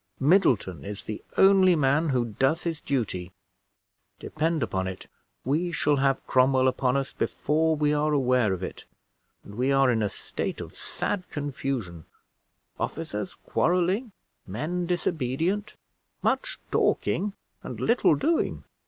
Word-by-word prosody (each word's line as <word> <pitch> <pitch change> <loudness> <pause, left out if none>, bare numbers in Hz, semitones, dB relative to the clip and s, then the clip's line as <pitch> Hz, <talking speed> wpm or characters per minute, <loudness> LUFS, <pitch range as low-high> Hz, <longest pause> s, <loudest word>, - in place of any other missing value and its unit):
Middleton 135 - +3
is 100 -1 -6
the 110 - -6
only 190 -2 +6
man 150 +2 +2
who 125 -3 +1
does 150 +6 +2
his 165 -3 -3
duty. 95 -9 -2 0.8
Depend 160 -2 -1
upon 95 -4 -1
it, 95 0 -6 0.4
we 160 +7 0
shall 150 -2 +2
have 135 0 +1
Cromwell 130 0 +3
upon 130 0 +1
us 135 0 -3
before 160 +1 +1
we 150 -1 +2
are 150 +1 +1
aware 125 -6 +2
of 95 -1 -3
it; - - -6 0.6
and 100 - -12
we 125 +5 0
are 135 -2 +4
in 115 -2 +1
a 105 - +1
state - - -4
of - - -8
sad 185 -3 -3
confusion: 130 - -4 0.7
officers - - -4
quarreling, 185 +7 0 0.4
men 160 - -3
disobedient, 175 - -1 0.5
much - - 0
talking, 205 0 +1 0.3
and - - -7
little 235 -9 +3
doing. 320 - 0
140 Hz, 135 wpm, -26 LUFS, 125-170 Hz, 0.8 s, only